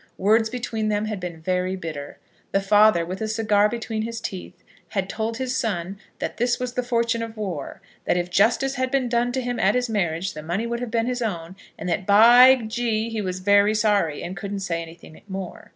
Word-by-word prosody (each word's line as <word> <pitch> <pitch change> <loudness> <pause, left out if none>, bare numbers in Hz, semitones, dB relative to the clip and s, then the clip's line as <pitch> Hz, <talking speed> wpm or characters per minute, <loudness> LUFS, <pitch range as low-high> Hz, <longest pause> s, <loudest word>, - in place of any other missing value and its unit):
Words 220 +3 +3
between 225 -3 -3
them 210 0 0
had 215 -2 -4
been 175 -3 -6
very 185 +2 -1
bitter. 155 -6 -7 0.4
The 195 - +4
father, 205 -3 +4
with 185 +5 -6
a 220 - -1
cigar 215 -2 +2
between 230 -1 -3
his 230 +1 -4
teeth, 190 -4 -7 0.3
had 195 -3 -2
told 220 +3 -3
his 260 -1 -2
son 200 -6 -2 0.2
that - - -4
this 240 +1 +1
was 250 -1 -3
the 250 - 0
fortune 235 -1 0
of 230 -1 -6
war, 180 -10 -5 0.2
that - - +2
if 175 0 -2
justice 235 +8 +3
had 260 0 -1
been 265 -2 0
done 240 0 +1
him 245 -1 -2
at - - +3
his 250 -1 0
marriage, 180 -4 -1
the 155 - -7
money 175 +8 -2
would 235 0 -3
have 245 -1 -4
been 230 0 0
his 250 0 -2
own, 180 -5 -4 0.2
and - - -6
that 180 +2 -2
by 240 +5 +8
G 225 0 -1
he 220 -1 -2
was 185 -1 -4
very 205 +2 +4
sorry, 205 -8 +1
and 180 - -5
couldn't 200 0 -5
say 170 -3 -2
anything 165 -1 -12
more. 190 -2 -7
215 Hz, 215 wpm, -23 LUFS, 185-235 Hz, 0.4 s, by